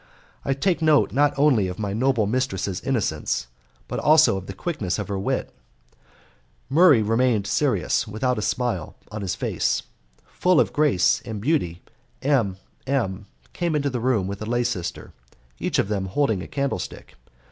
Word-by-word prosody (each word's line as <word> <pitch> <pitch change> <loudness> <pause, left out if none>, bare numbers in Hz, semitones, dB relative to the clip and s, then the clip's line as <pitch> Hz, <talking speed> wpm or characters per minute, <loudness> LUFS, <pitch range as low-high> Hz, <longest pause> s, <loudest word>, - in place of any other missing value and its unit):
I 135 - 0
take 170 +4 0
note 155 -2 +4
not 145 +1 +3
only 135 -9 +4
of 90 - -5
my 100 -2 -3
noble 120 -1 +2
mistress's 100 -5 -1
innocence, 100 - -1 0.4
but - - -3
also 155 -7 +5
of 95 -1 -6
the 95 - -6
quickness 105 - -3
of 105 -2 -4
her 100 -1 -2
wit. 95 - -2 1.1
Murray 145 -5 +6
remained 115 -1 +2
serious, 130 -2 +1
without 115 +3 -1
a - - -2
smile 115 -7 -2 0.2
on 105 0 -5
his 95 -3 -2
face. - - -1 0.4
Full 180 -2 +2
of - - +2
grace 145 -12 +3
and 110 -3 -5
beauty, 100 - -1 0.4
M 120 -10 +1 0.3
M 105 -7 -1 0.3
came 170 -3 -1
into 140 -2 0
the 125 - -2
room 115 -5 +1
with 100 +1 -5
a - - -3
lay 120 +1 +1
sister, 110 -8 -4 0.5
each - - -1
of - - +2
them 100 -2 -1
holding 110 -2 0
a - - -7
candlestick. 140 -1 -4
115 Hz, 165 wpm, -24 LUFS, 100-140 Hz, 1.1 s, Murray